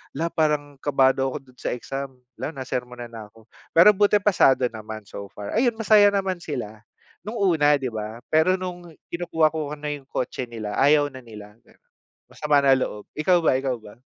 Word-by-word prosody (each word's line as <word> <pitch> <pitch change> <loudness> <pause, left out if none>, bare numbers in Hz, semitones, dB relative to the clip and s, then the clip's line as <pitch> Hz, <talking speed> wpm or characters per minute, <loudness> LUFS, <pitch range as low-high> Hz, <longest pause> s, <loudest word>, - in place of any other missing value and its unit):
"'La 165 +4 -2
parang 150 -3 -1
kabado 135 -1 +2
ako 135 - -5
dun 125 - -26
sa - - -2
exam." 135 +2 -6 0.2
'La 155 - -4
nasermonan 125 -3 -5
na 115 -2 -9
ako, 110 +1 -21 0.2
pero 170 +5 +8
buti 205 0 +4
pasado 180 -11 +4
naman 110 -1 -8
so 100 - -7
far. 100 -1 -7
Ayun, 240 0 +3
masaya 210 -2 +5
naman 195 -2 -1
sila, 120 -10 -7 0.4
nung 215 - -5
una, 150 -6 +3
di 130 - -2
ba? 110 +1 -6
Pero 160 +4 +4
nung 180 -1 -6 0.2
kinukuha 165 -2 +1
ko 155 -2 -4
na 150 0 -5
yung 145 -2 -6
kotse 130 -1 -4
nila 110 -3 -6
ayaw 145 +1 +4
na 130 -2 -12
nila, 105 -1 -12 0.7
masama 145 -2 +1
na 135 - +6
loob. 130 -5 -1
Ikaw 170 +3 +2
ba, - - +4
ikaw 135 -2 -1
ba? 110 0 -15
140 Hz, 180 wpm, -24 LUFS, 120-165 Hz, 0.7 s, pero